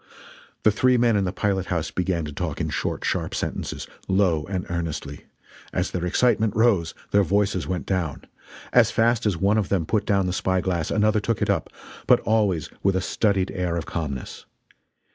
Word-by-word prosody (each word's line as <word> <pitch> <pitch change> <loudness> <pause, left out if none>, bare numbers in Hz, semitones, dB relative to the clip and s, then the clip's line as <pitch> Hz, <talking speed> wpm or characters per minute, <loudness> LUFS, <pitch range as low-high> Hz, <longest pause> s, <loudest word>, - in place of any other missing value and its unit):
The 110 - +5
three 125 +4 +3
men 120 -2 +3
in 100 -2 +2
the 90 - -1
pilot 95 -1 -1
house 85 -3 -2
began 90 -3 -1
to 75 - -6
talk 80 -1 -3
in - - -1
short, - - -2
sharp - - -1
sentences, - - -4 0.2
low 95 -5 +2
and 95 -2 -3
earnestly. 85 -4 -4 0.5
As - - -1
their 90 0 -2
excitement 110 +1 +2
rose, 105 -8 +2 0.2
their 100 - +5
voices 100 0 +1
went 90 -2 -3
down. 90 -7 -2 0.5
As - - +6
fast 115 0 +2
as 95 -5 0
one 100 +5 +2
of 105 - -2
them 90 -5 +1
put 105 +5 0
down 100 -2 +2
the 90 - -1
spy 95 0 0
glass 90 -4 -1
another 110 +1 +2
took 115 +1 -1
it - - +1
up - - -1 0.4
but - - +6
always 100 -7 +1
with 95 -1 +2
a - - +2
studied 100 0 0
air 90 -3 -2
of 80 - -3
calmness. 70 -6 -5
95 Hz, 190 wpm, -24 LUFS, 85-105 Hz, 0.5 s, As